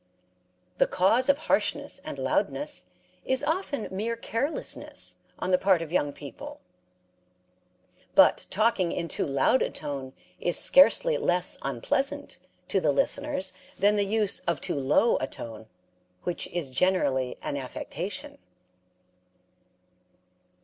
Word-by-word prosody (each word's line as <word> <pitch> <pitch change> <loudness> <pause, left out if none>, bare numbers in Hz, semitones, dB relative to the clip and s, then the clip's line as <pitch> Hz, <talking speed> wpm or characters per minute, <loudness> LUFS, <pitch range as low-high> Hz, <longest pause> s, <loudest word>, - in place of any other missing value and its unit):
The - - +5
cause 225 +9 +2
of 280 - +5
harshness 310 - 0
and - - -6
loudness - - -1 0.4
is 260 0 +1
often 315 - -1
mere 215 +5 -2
carelessness 230 +6 -2 0.2
on 185 - -2
the 180 - +4
part 185 -4 +3
of 160 - -9
young 145 -5 +1
people. 140 -3 -10 1.6
But - - +5
talking 205 -4 +1
in 170 - -3
too - - -2
loud 140 - +2
a - - +1
tone 140 -3 -5 0.3
is 175 - +2
scarcely 480 - +5
less 180 0 +2
unpleasant 270 - -2 0.3
to - - +2
the - - +3
listeners 290 - 0 0.2
than 205 +2 +3
the 205 - +2
use 210 0 +1
of 170 -4 +1
too - - -2
low 145 - +3
a 130 - -2
tone, 110 -3 -9 0.6
which 175 - -3
is 165 -7 -4
generally 130 -6 +1
an - - -3
affectation. 160 +7 -5
185 Hz, 125 wpm, -27 LUFS, 145-230 Hz, 1.6 s, The